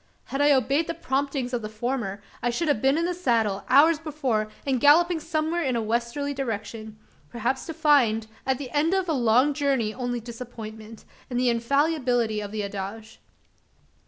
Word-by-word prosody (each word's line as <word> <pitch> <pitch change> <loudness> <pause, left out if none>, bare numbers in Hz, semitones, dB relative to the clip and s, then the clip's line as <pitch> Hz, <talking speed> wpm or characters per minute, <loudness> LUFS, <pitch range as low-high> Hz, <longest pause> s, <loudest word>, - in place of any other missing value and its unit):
Had 275 - 0
I 290 0 +5
obeyed 280 +3 +2
the 335 - -3
promptings 270 -4 -2
of 245 - -1
the 215 - -5
former, 215 -3 -3 0.2
I 240 - +1
should 315 +8 -1
have 285 -8 +1
been 270 +3 +3
in 335 - +1
the 360 - -1
saddle, 225 - 0
hours 295 +4 +6
before, 270 -9 -1 0.2
and 265 -3 +1
galloping 335 +4 +5
somewhere 315 +2 -1
in 265 -6 0
a 230 - 0
westerly 235 +6 -1
direction 220 -4 -5 0.3
perhaps 240 +6 -2
to 325 - -4
find, 275 -9 +3 0.2
at 265 -1 0
the 265 -2 -7
end 310 +5 +2
of 380 -1 0
a 325 - +1
long 250 +2 +3
journey 270 -7 0
only 245 -1 -3
disappointment, 225 -2 -9 0.2
and 245 -1 -1
the 250 0 +3
infallibility 245 -3 +1
of 205 -1 -6
the 215 -1 -3
adage. 200 +3 -6
250 Hz, 180 wpm, -25 LUFS, 225-290 Hz, 0.3 s, hours